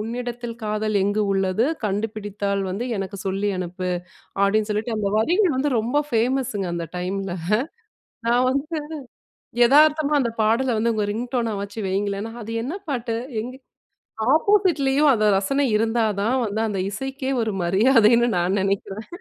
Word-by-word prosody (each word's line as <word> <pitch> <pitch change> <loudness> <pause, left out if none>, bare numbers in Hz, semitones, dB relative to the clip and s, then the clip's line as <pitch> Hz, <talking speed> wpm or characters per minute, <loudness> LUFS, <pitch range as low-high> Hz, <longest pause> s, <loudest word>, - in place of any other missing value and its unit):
உன்னிடத்தில் 240 +1 -5
காதல் 215 0 -1
எங்கு 205 +2 +1
உள்ளது 195 +3 +1 0.2
கண்டுபிடித்தால் 205 -1 -2
வந்து 200 +6 -3
எனக்கு 195 +1 -4
சொல்லி 195 +2 -1
அனுப்பு, 180 0 -4 0.5
அப்படின்னு 210 +2 +2
சொல்லிட்டு 215 +2 -1
அந்த 205 -2 0
வரிகள் 345 - +3
வந்து 285 +3 +1
ரொம்ப 235 +6 -1
ஃபேமஸுங்க, 240 -3 0
அந்த 170 -1 -3
டைம்ல. 190 +1 -3 0.9
நான் 245 +2 +3
வந்து 285 +5 -2 0.9
எதார்த்தமா 300 +2 +4
அந்த 235 - 0
பாடல 235 +3 +2
வந்து 230 +1 +1
உங்க 210 -1 0
ரிங்டோனா 235 0 -2
வச்சு 200 +2 -8
வையுங்களேன்னா, 200 +3 -2
அது 225 - -6
என்ன 280 +7 -4 0.2
பாட்டு? 235 -4 -2 0.3
எங்க 255 +2 -7 0.8
ஆப்போசிட்லேயும் 305 -6 +3
அந்த 215 -2 +1
ரசனை 275 +9 0
இருந்தா 225 +1 +1 0.2
தான் 235 +5 +1
வந்து, 210 +1 -3
அந்த 200 -3 -2
இசைக்கே 270 +5 -4
ஒரு 220 -2 -2
மரியாதைன்னு 230 +5 +4
நான் 180 +3 +1
நினைக்கிறேன். 195 +2 -2
225 Hz, 135 wpm, -23 LUFS, 200-255 Hz, 0.9 s, எதார்த்தமா